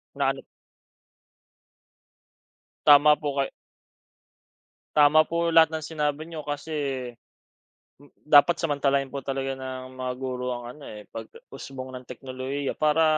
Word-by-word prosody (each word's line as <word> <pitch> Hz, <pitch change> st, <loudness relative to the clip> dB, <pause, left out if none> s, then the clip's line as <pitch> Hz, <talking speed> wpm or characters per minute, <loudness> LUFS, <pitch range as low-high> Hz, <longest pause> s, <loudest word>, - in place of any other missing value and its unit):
Na 140 Hz, -1 st, +1 dB
ano 135 Hz, -, -9 dB, 2.4 s
Tama 150 Hz, 0 st, +7 dB
po 145 Hz, -2 st, -3 dB
kay 135 Hz, -, -1 dB, 1.5 s
tama 155 Hz, +1 st, +6 dB
po 170 Hz, 0 st, 0 dB
lahat 160 Hz, -1 st, +5 dB
ng 155 Hz, -, -4 dB
sinabi 150 Hz, -1 st, -2 dB
niyo, 165 Hz, -1 st, -8 dB
kasi 145 Hz, -4 st, -4 dB, 1.1 s
dapat 150 Hz, +3 st, +6 dB
samantalain 140 Hz, -3 st, 0 dB
po 140 Hz, -, -4 dB
talaga 135 Hz, 0 st, -3 dB
ng 130 Hz, -1 st, -7 dB
mga 125 Hz, 0 st, -2 dB
guro 125 Hz, -1 st, -3 dB
ang 120 Hz, -, -7 dB
ano, 145 Hz, -, -14 dB
eh, 105 Hz, -1 st, -9 dB
pag-usbong 130 Hz, +3 st, -9 dB
ng 125 Hz, 0 st, -9 dB
teknolohiya, 130 Hz, +2 st, -4 dB
para 155 Hz, +1 st, +3 dB
140 Hz, 120 wpm, -26 LUFS, 130-150 Hz, 2.4 s, Tama